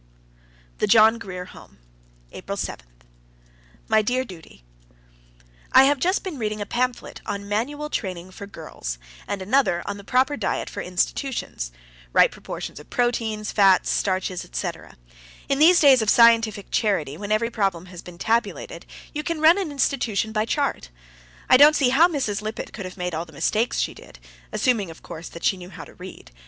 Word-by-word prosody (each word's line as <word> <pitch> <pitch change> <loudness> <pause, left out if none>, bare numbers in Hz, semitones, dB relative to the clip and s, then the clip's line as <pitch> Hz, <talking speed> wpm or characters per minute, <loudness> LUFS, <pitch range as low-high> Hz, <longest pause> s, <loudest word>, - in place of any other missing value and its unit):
THE - - +1
JOHN 225 +1 +6
GRIER 180 -5 -7
HOME, - - -15 0.5
April - - -6
7. - - -5 1.0
My 220 -1 +4
dear 250 +4 0
Judy: 160 - -13 1.1
I - - +9
have 280 0 +3
just 370 +7 +1
been 350 -8 -6
reading 215 -1 -2
a 205 - -3
pamphlet 250 +3 -2
on 200 0 -4
manual 275 +9 -2
training 185 -3 -4
for 200 +2 -9
girls, 155 - -7 0.3
and 195 -2 -3
another 205 -6 +2
on 200 - -4
the 200 - -11
proper 260 +6 +2
diet - - -2
for - - -5
institutions 180 - -2 0.4
right - - +5
proportions - - -7
of 150 - -15
proteins, 225 -3 -1
fats, 195 -3 +4
starches, 185 -2 -1
etc. - - -6 0.5
In 275 0 0
these 345 +3 +7
days 270 -5 +6
of 220 - 0
scientific 225 -3 +4
charity, 195 - 0
when 205 +5 -6
every 230 +2 +1
problem 195 -6 -1
has 180 -2 -10
been 180 -1 -12
tabulated, 230 +6 -2 0.3
you 300 - -2
can 335 +1 -3
run 325 +5 +6
an 360 -6 -3
institution 245 -6 0
by 215 0 0
chart. 280 +4 -1 0.6
I - - +7
don't 295 +3 +8
see 270 -4 +3
how 300 +7 +6
Mrs. 255 - -2
Lippett 215 +1 -6
could 195 - -6
have 185 +2 -9
made 180 -1 -3
all 160 +2 -3
the 160 - -17
mistakes 215 - 0
she - - -1
did, - - -15 0.3
assuming, 225 -8 +1
of 165 - -12
course, 165 +1 -8
that 170 - -11
she 190 - +2
knew 180 0 -10
how 165 -4 -10
to - - -15
read. 180 - -11
215 Hz, 175 wpm, -23 LUFS, 185-255 Hz, 1.1 s, I